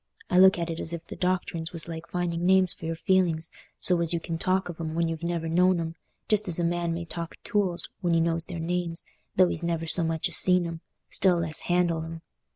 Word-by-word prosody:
I 180 Hz, -, +4 dB
look 190 Hz, 0 st, +7 dB
at 170 Hz, -1 st, -3 dB
it 165 Hz, -, -5 dB
as 165 Hz, -, -1 dB
if 170 Hz, 0 st, -6 dB
the -, -, -9 dB
doctrines 180 Hz, -2 st, -2 dB
was 165 Hz, -2 st, 0 dB
like 165 Hz, 0 st, -7 dB
finding 175 Hz, -1 st, -2 dB
names 185 Hz, -1 st, +4 dB
for -, -, -10 dB
your 165 Hz, -, -2 dB
feelings, 170 Hz, -2 st, +1 dB, 0.3 s
so 180 Hz, -2 st, +3 dB
as 170 Hz, 0 st, +1 dB
you 170 Hz, -, 0 dB
can 165 Hz, 0 st, -5 dB
talk 185 Hz, +2 st, 0 dB
of 175 Hz, -2 st, -8 dB
'em 160 Hz, -1 st, -4 dB
when 170 Hz, 0 st, +1 dB
you've 165 Hz, -1 st, -4 dB
never 170 Hz, -1 st, -2 dB
known 180 Hz, +2 st, +3 dB
'em, 165 Hz, -1 st, -4 dB, 0.3 s
just 210 Hz, -1 st, +2 dB
as 175 Hz, -, +2 dB
a 175 Hz, -, 0 dB
man 170 Hz, 0 st, -1 dB
may 170 Hz, 0 st, -5 dB
talk 170 Hz, 0 st, -6 dB
o' -, -, -53 dB
tools 190 Hz, -6 st, 0 dB
when 175 Hz, -2 st, 0 dB
he -, -, +3 dB
knows 165 Hz, 0 st, 0 dB
their 180 Hz, -2 st, -7 dB
names, 170 Hz, 0 st, -2 dB, 0.3 s
though 185 Hz, -1 st, +5 dB
he's -, -, -4 dB
never 170 Hz, -1 st, -2 dB
so 170 Hz, +1 st, +4 dB
much 160 Hz, -1 st, 0 dB
as -, -, +1 dB
seen 180 Hz, -1 st, +4 dB
'em, 165 Hz, -1 st, -6 dB, 0.3 s
still 185 Hz, -2 st, +7 dB
less 160 Hz, -2 st, -1 dB
handled 175 Hz, -2 st, 0 dB
'em. 165 Hz, 0 st, -8 dB
170 Hz, 250 wpm, -26 LUFS, 165-180 Hz, 0.3 s, look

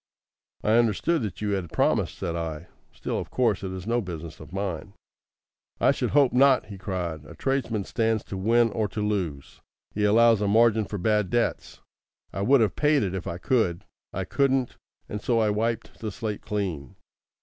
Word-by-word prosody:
"I 110 Hz, +2 st, +4 dB
understood 120 Hz, -, +1 dB
that 105 Hz, -3 st, -5 dB
you 105 Hz, -1 st, -1 dB
had 95 Hz, -5 st, -2 dB
promised," -, -, +1 dB
said 85 Hz, -, -3 dB
I. 80 Hz, -1 st, -4 dB, 0.3 s
"Still, -, -, -4 dB
of -, -, -6 dB
course, 115 Hz, -6 st, +1 dB
it 95 Hz, -, -3 dB
is 95 Hz, -1 st, -6 dB
no 120 Hz, +2 st, +1 dB
business 85 Hz, -5 st, -7 dB
of 75 Hz, 0 st, -12 dB
mine." 95 Hz, -3 st, -4 dB, 0.9 s
"I -, -, +5 dB
should -, -, -1 dB
hope 140 Hz, -3 st, +4 dB
not," 130 Hz, 0 st, +5 dB
he 100 Hz, -2 st, -10 dB
cried. 90 Hz, -6 st, -4 dB
"A -, -, -12 dB
tradesman 125 Hz, -6 st, -1 dB
stands 110 Hz, 0 st, 0 dB
to -, -, -7 dB
win 115 Hz, +4 st, +3 dB
or 110 Hz, 0 st, -1 dB
to 105 Hz, +2 st, -5 dB
lose. 90 Hz, -10 st, -3 dB, 0.3 s
He 105 Hz, -, -1 dB
allows 115 Hz, +1 st, +5 dB
a 105 Hz, -, +1 dB
margin 110 Hz, +1 st, +4 dB
for 105 Hz, -, -5 dB
bad 105 Hz, 0 st, +1 dB
debts. 120 Hz, -1 st, -1 dB, 0.5 s
I 100 Hz, -, -3 dB
would 130 Hz, +5 st, +4 dB
have 105 Hz, -4 st, +1 dB
paid 150 Hz, -3 st, +3 dB
it 95 Hz, -2 st, -2 dB
if 95 Hz, -2 st, -4 dB
I 85 Hz, -, -3 dB
could. 95 Hz, -5 st, 0 dB, 0.3 s
I -, -, -3 dB
couldn't, 135 Hz, -2 st, +1 dB, 0.3 s
and 105 Hz, -, -5 dB
so 120 Hz, -, +1 dB
I 110 Hz, -2 st, +3 dB
wiped 115 Hz, +2 st, -2 dB
the 110 Hz, -2 st, -4 dB
slate 105 Hz, 0 st, -4 dB
clean. 90 Hz, -10 st, -4 dB
105 Hz, 190 wpm, -26 LUFS, 95-115 Hz, 0.9 s, I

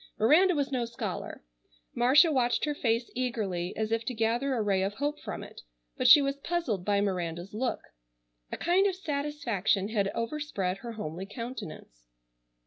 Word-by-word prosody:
Miranda 325 Hz, -, +5 dB
was 285 Hz, -1 st, -1 dB
no 255 Hz, -3 st, 0 dB
scholar. 230 Hz, -, -5 dB, 0.5 s
Marcia 280 Hz, +7 st, +5 dB
watched 245 Hz, -2 st, +1 dB
her 295 Hz, -, -1 dB
face 235 Hz, -3 st, -1 dB
eagerly, 210 Hz, -8 st, -2 dB
as 220 Hz, 0 st, -1 dB
if 225 Hz, 0 st, 0 dB
to 250 Hz, +1 st, -4 dB
gather 235 Hz, +5 st, 0 dB
a 230 Hz, -, 0 dB
ray 195 Hz, -2 st, +1 dB
of 195 Hz, +2 st, -1 dB
hope 290 Hz, +3 st, -2 dB
from -, -, -6 dB
it, -, -, -11 dB, 0.3 s
but -, -, +1 dB
she 290 Hz, -, +9 dB
was 275 Hz, 0 st, -1 dB
puzzled 280 Hz, -, -2 dB
by 200 Hz, +1 st, +2 dB
Miranda's 180 Hz, -2 st, -2 dB
look. 245 Hz, +4 st, -2 dB, 0.7 s
A -, -, -3 dB
kind 370 Hz, +4 st, +3 dB
of 380 Hz, -, -1 dB
satisfaction 280 Hz, -, -1 dB
had 205 Hz, -3 st, +1 dB
overspread 230 Hz, -7 st, -2 dB
her 235 Hz, +2 st, -7 dB
homely 185 Hz, -2 st, -6 dB
countenance. 205 Hz, -, -8 dB
230 Hz, 165 wpm, -29 LUFS, 200-280 Hz, 0.7 s, she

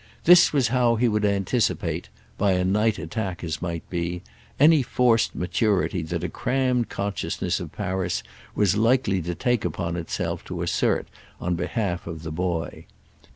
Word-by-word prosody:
This 175 Hz, +1 st, +7 dB
was 135 Hz, -5 st, +2 dB
how 120 Hz, -1 st, +3 dB
he 120 Hz, +2 st, +2 dB
would 105 Hz, -1 st, 0 dB
anticipate—by 100 Hz, -1 st, -1 dB
a 90 Hz, 0 st, +1 dB
night 105 Hz, +3 st, +2 dB
attack, 95 Hz, -7 st, -4 dB
as 80 Hz, -3 st, -3 dB
might 85 Hz, -2 st, -4 dB
be—any 90 Hz, -, +1 dB
forced 120 Hz, -2 st, +2 dB
maturity 95 Hz, -1 st, 0 dB
that 80 Hz, +1 st, -4 dB
a -, -, 0 dB
crammed 125 Hz, 0 st, 0 dB
consciousness 100 Hz, -1 st, -2 dB
of -, -, -7 dB
Paris 90 Hz, -1 st, -2 dB, 0.3 s
was 100 Hz, -2 st, +3 dB
likely 110 Hz, -4 st, +2 dB
to 85 Hz, +1 st, -4 dB
take 120 Hz, +2 st, 0 dB
upon 85 Hz, 0 st, -2 dB
itself 85 Hz, -1 st, -3 dB
to -, -, -4 dB
assert -, -, 0 dB, 0.3 s
on 90 Hz, -, -1 dB
behalf 90 Hz, 0 st, -2 dB
of 80 Hz, -2 st, -6 dB
the 80 Hz, -, -5 dB
boy. 85 Hz, -2 st, -3 dB
95 Hz, 150 wpm, -24 LUFS, 85-115 Hz, 0.3 s, This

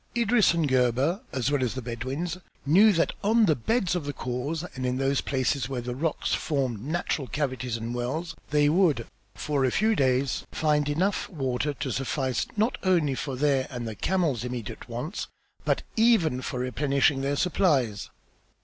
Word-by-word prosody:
Idris 230 Hz, -5 st, +4 dB
and 165 Hz, -3 st, +1 dB
Gebhr 130 Hz, -, +2 dB
as 130 Hz, +1 st, -1 dB
well 145 Hz, -2 st, +1 dB
as 125 Hz, -, -1 dB
the 130 Hz, -, -3 dB
Bedouins 130 Hz, +9 st, -4 dB, 0.3 s
knew 195 Hz, +9 st, +6 dB
that 170 Hz, -1 st, +1 dB
on 220 Hz, +2 st, +4 dB
the 160 Hz, -6 st, +3 dB
beds 190 Hz, -, 0 dB
of 170 Hz, -5 st, -2 dB
the 145 Hz, -, -3 dB
khors 135 Hz, +6 st, -3 dB
and 130 Hz, -, -5 dB
in 125 Hz, 0 st, 0 dB
those 135 Hz, +1 st, +1 dB
places 135 Hz, 0 st, -1 dB
where 130 Hz, -2 st, -2 dB
the 120 Hz, +1 st, -4 dB
rocks 150 Hz, +4 st, -1 dB
formed 130 Hz, -8 st, -1 dB
natural 155 Hz, -2 st, -2 dB
cavities 130 Hz, -2 st, -2 dB
and 115 Hz, +1 st, -4 dB
wells 130 Hz, +8 st, -3 dB
they 145 Hz, 0 st, +3 dB
would, 155 Hz, -7 st, +3 dB, 0.3 s
for 145 Hz, +1 st, -1 dB
a 130 Hz, -, +3 dB
few 220 Hz, -, +2 dB
days, 130 Hz, -3 st, +1 dB
find 150 Hz, -2 st, +1 dB
enough 185 Hz, +7 st, 0 dB
water 135 Hz, -3 st, -1 dB
to 135 Hz, 0 st, -3 dB
suffice 130 Hz, 0 st, -1 dB
not 220 Hz, +4 st, +1 dB
only 170 Hz, -7 st, +2 dB
for 135 Hz, 0 st, -4 dB
their 135 Hz, -1 st, +1 dB
and 120 Hz, -3 st, -5 dB
the 110 Hz, -, -4 dB
camels' 155 Hz, -, 0 dB
immediate 125 Hz, -1 st, -6 dB
wants 125 Hz, -, -4 dB, 0.4 s
but -, -, +1 dB
even 220 Hz, -, +3 dB
for 130 Hz, -1 st, -4 dB
replenishing 135 Hz, +2 st, +1 dB
their 140 Hz, +1 st, 0 dB
supplies. 140 Hz, -, +1 dB
140 Hz, 175 wpm, -27 LUFS, 125-165 Hz, 0.4 s, knew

